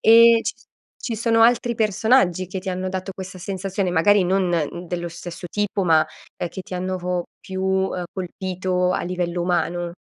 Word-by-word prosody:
E 230 +1 +7
ci - - -2
s - - -23 0.4
ci 230 -3 -3
sono 225 0 +2
altri 235 +1 +4
personaggi 215 -3 +2
che 190 +2 -5
ti 190 +1 -6
hanno 185 0 -2
dato 190 +1 -4
questa 185 -1 -8
sensazione, 195 0 -2
magari 190 +4 +4
non 175 -2 0
dello 175 0 -3
stesso 175 +1 -8
tipo 205 0 -1
ma, 160 -3 +4 0.3
ehm, 175 - -3
che 190 - -7
ti 185 - -8
hanno 185 +1 -2
po 180 -1 -2 0.2
più, 190 0 -1
ehm, 180 -1 -3
colpito 185 0 -1
a - - -1
livello 175 -1 -2
umano? 175 -1 -1
185 Hz, 180 wpm, -22 LUFS, 175-195 Hz, 0.4 s, E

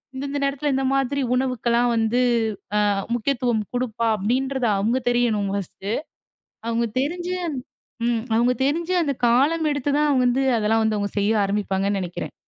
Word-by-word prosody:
இந்த 265 - -4
இந்த 285 +1 -2
நேரத்துல 280 +1 -1
இந்த 270 - 0
மாதிரி 275 +1 0
உணவுக்கெல்லாம் 245 -2 +1
வந்து 225 +2 +1 0.6
அ - - +4 0.3
முக்கியத்துவம் 240 -2 0
கொடுப்பா! 230 -2 -1
அப்பபிடின்றத 255 +5 -1
அவுங்க 225 +6 +1
தெரியணும் 230 -5 +1
ஃபர்ஸ்டு 200 +1 -5 0.8
அவுங்க 230 0 0
தெரிஞ்சு 350 +6 -2 0.7
ம் 235 -2 0
அவுங்க 240 +2 +3
தெரிஞ்சு 335 +5 0
அந்தக் 280 -5 -3
காலம் 300 +7 +3
எடுத்து 285 0 -1
தான் 300 0 +3
அவுங்க 260 -3 +3
வந்து 260 +2 +1
அதெல்லாம் 220 +1 +2
வந்து 210 -2 -1
செய்ய 205 +2 +2
ஆரம்பிப்பாங்கன்னு 200 0 -1
நினைக்கிறேன். 175 -1 -6
245 Hz, 145 wpm, -23 LUFS, 220-275 Hz, 0.8 s, அ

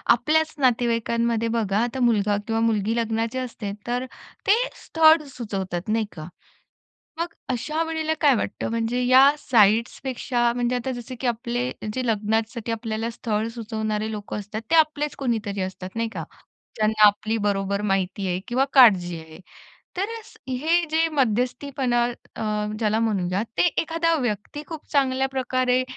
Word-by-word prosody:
आपल्याच 315 +1 +1
नातेवाईकांमध्ये 235 -2 +1
बघा 205 -2 0
आता 245 +2 -3
मुलगा 210 -4 +2
किंवा 225 0 0
मुलगी 220 -1 +1
लग्नाची 230 +1 -1
असते 235 -5 -4 0.2
तर 245 +1 -1 0.4
ते 405 - +6 0.3
स्थळ 320 -1 +5
सुचवतात, 195 -6 -3
नाही 220 0 +1
का? 155 -2 -7 0.9
मग 340 0 -2 0.2
अशा 305 +6 -1
वेळेला 320 -1 -1
काय 285 -4 +5
वाटतं, - - -3
म्हणजे 230 +2 -1
या 260 +2 +7
साइट्सपेक्षा, 240 +1 +2
म्हणजे 245 0 0
आता 250 +2 -2
जसं 255 +2 -8
की 260 - -1
आपले 240 +1 -1 0.2
जे 255 +1 -2
लग्नासाठी 220 +2 -1
आपल्याला 225 0 -3
स्थळ 220 -1 -2
सुचवणारे 220 -1 -3
लोकं 210 -1 -5
असतात, 210 +2 -6
ते - - +5
आपलेच 300 -2 +2
कुणीतरी 220 -7 -2
असतात, 185 0 -5
नाही 230 0 -1
का? 165 -4 -4 0.5
ज्यांना 215 0 +4
आपली 215 +2 0
बरोबर 200 -1 0
माहिती 195 -1 -1
आहे 180 0 -1
किंवा 255 +3 +2
काळजी 190 -10 +6
आहे. 160 0 -13 0.6
तर 400 +4 -1
अ, 455 - -7 0.3
हे 320 +7 +2
जे 325 +1 +3
मध्यस्थीपणा 250 0 0 0.3
अ, - - -6 0.4
ज्याला 220 0 +1
म्हणूया, 195 -3 0
ते - - +5
एखादा 330 0 0
व्यक्ती 240 +5 -3
खूप 320 -2 -8
चांगल्या 265 -2 +2
प्रकारे 255 -1 +1
230 Hz, 145 wpm, -24 LUFS, 215-260 Hz, 0.9 s, या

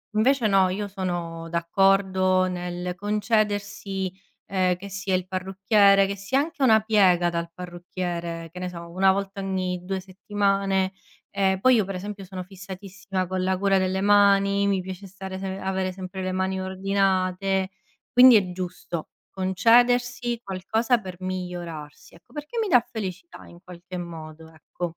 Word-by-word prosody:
invece 245 +1 +3
no, 195 -2 +4
io 205 +2 -3
sono 175 -4 -4
d'accordo 185 +2 +2
nel 180 0 -4
concedersi, 205 -2 -1 0.4
ehm, 185 -2 +1
che 200 +2 -9
sia 195 0 -3
il 185 0 0
parrucchiere, 195 +2 +3
che 200 - -3
sia 200 +8 0
anche 295 -1 -2
una 220 -4 +6
piega 190 -5 +3
dal 170 0 -3
parrucchiere, 175 -2 -5
che 180 - -13
ne 180 - -3
so, 170 -1 -9
1 190 +2 +3
volta 195 0 -3
ogni 185 -2 -2
2 190 +1 -3
settimane. 195 0 0 0.4
Ehm, 190 -1 +2
poi 255 +4 +5
io, 220 - +3
per 195 0 -5
esempio, 200 +2 -6
sono 185 -1 -7
fissatissima 190 0 -6
con 185 0 -2
la 190 0 +1
cura 195 0 +2
delle 190 0 0
mani, 200 0 +4
mi 195 -1 +2
piace 190 +1 -8
stare 190 0 -7
se 190 0 -4
avere 190 -1 -1
sempre 185 0 -7
le 185 0 -2
mani 190 0 -1
ordinate. 190 0 0 0.4
Quindi, 250 -2 +9
è 185 -3 -1
giusto 175 -2 -5 0.2
concedersi 240 +5 +2
qualcosa 220 +5 0
per 185 -4 -8
migliorarsi, 175 -5 -6
ecco, 170 - -22
perché 295 +10 -7
mi 430 - -1
dà 250 - +7
felicità 185 -5 -7
in 170 - -14
qualche 180 0 -9
modo, 160 -2 -8
ecco. 160 +2 -11
190 Hz, 155 wpm, -25 LUFS, 180-200 Hz, 0.4 s, Quindi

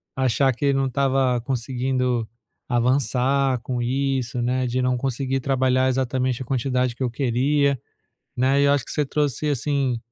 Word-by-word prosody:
achar 130 +1 +2
que 140 +3 +1
não 135 0 +1
estava 130 -2 +1
conseguindo 125 -1 -1 0.4
avançar 130 +2 +1
com 125 +1 -3
isso, 130 -1 -1
né, 125 +1 0
de 125 +1 -1
não 125 0 +1
conseguir 135 +1 -2
trabalhar 130 0 +2
exatamente 130 -1 -1
a - - -5
quantidade 125 -1 0
que 130 - -4
eu 125 - 0
queria, 140 +2 +1 0.6
né, 130 +3 +2
e - - +4
eu 140 - +4
acho 140 -4 +1
que - - -10
você 150 -2 0
trouxe, 150 +1 -1
assim, 140 -3 0
130 Hz, 160 wpm, -23 LUFS, 125-135 Hz, 0.6 s, e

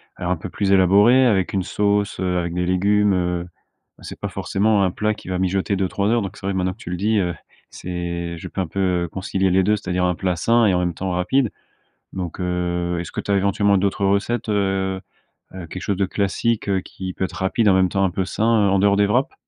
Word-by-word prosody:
alors, 90 0 -3
un - - +2
peu 85 +3 -8
plus 100 +1 -1
élaborées 100 +7 +5
avec 95 -5 +1
une 95 - +1
sauce, 100 +2 0
heu, 90 -1 0
avec 85 0 -3
des 90 0 0
légumes. 90 -2 +1 0.6
Bah, - - -16
c'est - - -9
pas - - -3
forcément 105 0 +1
un 95 - +2
plat 110 +4 -1
qui - - -13
va 90 - -1
mijoter 95 +2 0
2-3 100 +1 -1
heures. 115 +1 +2
Donc 100 +1 -7
c'est 100 - -10
vrai 100 - 0
que, - - -2
maintenant 95 0 0
tu 85 - -9
le 90 - -3
dis, 105 +3 +1
heu, 90 -3 -1 0.3
c'est 85 -1 -5
je - - -7
peux 95 - -4
un 90 - -2
peu 90 0 0
concilier 95 0 -1
les 95 +1 +4
2, 105 +3 +3
c'est-à-dire 90 -3 -1
un 90 -1 +1
plat 90 0 -1
sain 115 +6 +3
et 100 - +3
en 90 - +2
même 90 -1 -1
temps, 95 0 -3
rapide. 105 +8 +1 0.6
Donc 90 -3 -5
heu, 90 -1 -1
est-ce 85 - -6
que - - -3
tu 100 - -2
as - - +3
éventuellement 100 +1 +2
d'autres 100 +1 0
recettes, 100 +4 0
heu 95 -2 0 0.5
heu, 95 -2 -7
quelque 90 +3 -7
chose 100 - -1
de 100 - +1
classique, 100 +4 -1
heu, 95 -1 +1
qui 95 0 -7
peut - - -4
être - - -8
rapide, 105 +3 +1
en - - +5
même 95 0 +4
temps, 95 +1 0
un 95 - +3
peu 95 0 -2
sain, 105 - -3
en 105 -4 +3
dehors 100 +1 +3
des 105 - +4
wraps? 125 +6 +1
95 Hz, 245 wpm, -21 LUFS, 90-100 Hz, 0.6 s, élaborées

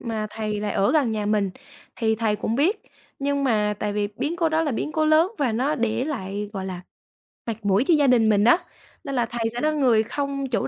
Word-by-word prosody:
mà 225 -3 -3
thầy 215 -1 -3
lại 210 -1 -2
ở 195 - +2
gần 290 -7 +2
nhà 215 -1 -2
mình 205 -2 +1 0.5
thì 220 -2 +1
thầy 220 -1 0
cũng 215 +2 -2
biết. 315 - +1 0.4
Nhưng 280 0 0
mà 210 -4 +1
tại 210 -1 -2
vì 205 0 -1
biến 310 +7 -2
cố 335 -2 +2
đó 320 +1 +1
là 295 -4 -1
biến 300 +6 -3
cố 310 0 +1
lớn 315 +4 +4
và 265 -5 +1
nó 260 +7 0
để 235 -2 -1
lại, 205 -8 -4
gọi 190 -3 -4
là, 185 -2 -5 0.7
mặt 225 -2 -5
mũi 200 +3 +3
cho 345 - +5
gia 295 -3 +4
đình 235 -4 +4
mình 205 -1 +3
á, 240 +8 +6 0.5
nên 275 -1 -4
là 240 -2 +2
thầy 230 0 -2
sẽ 245 - -4
là 305 - +2
người 250 -7 +3
không 275 +3 -3
chủ 235 - -1
230 Hz, 240 wpm, -24 LUFS, 210-285 Hz, 0.7 s, á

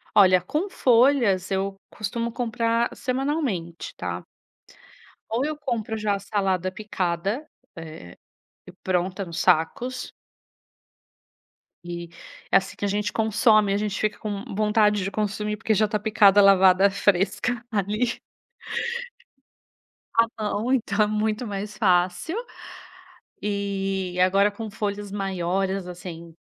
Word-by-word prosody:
Olha 185 -2 +7
com 305 - -2
folhas 240 - +3
eu 195 0 -1 0.2
costumo 230 +3 -3
comprar 230 -1 0
semanalmente 255 - -2
tá. - - -4 1.1
Ou 235 +5 0
eu 305 0 -3
compro 230 -6 -3
já 210 -1 0
a - - -4
salada 190 -2 -1
picada 200 - -2 0.3
,eh, 155 - -10 0.5
e - - -9
pronta 185 +1 -1
nos 170 -2 -5
sacos. 185 +9 +1 1.7
E, 170 -1 -6 0.4
é - - +6
assim 195 - -3
que 205 - -2
a - - +1
gente 205 +1 -1
consome 220 -1 +3
e - - +2
a - - +1
gente 210 -1 -2
fica 215 0 0
com 205 -2 -4
vontade 210 -1 +3
de 195 - -3
consumir, 210 0 -2
porque 220 0 +1
já 215 +1 +3
tá 210 0 -1
picada, 205 -1 +5
lavada, 195 0 +6
fresca 200 +5 +1
ali. 215 +2 -1 2.0
A 230 0 +5
mão, 215 +3 -1
então, 215 -5 +2
é - - -2
muito 215 +2 -1
mais 205 +1 -5
fácil. 185 - +1 1.1
E, 195 -2 -2
agora 195 +3 +4
com 220 +2 -6
folhas 205 -1 -4
maiores 190 -1 -1
assim, 170 -2 -9
205 Hz, 125 wpm, -24 LUFS, 190-220 Hz, 2.0 s, Olha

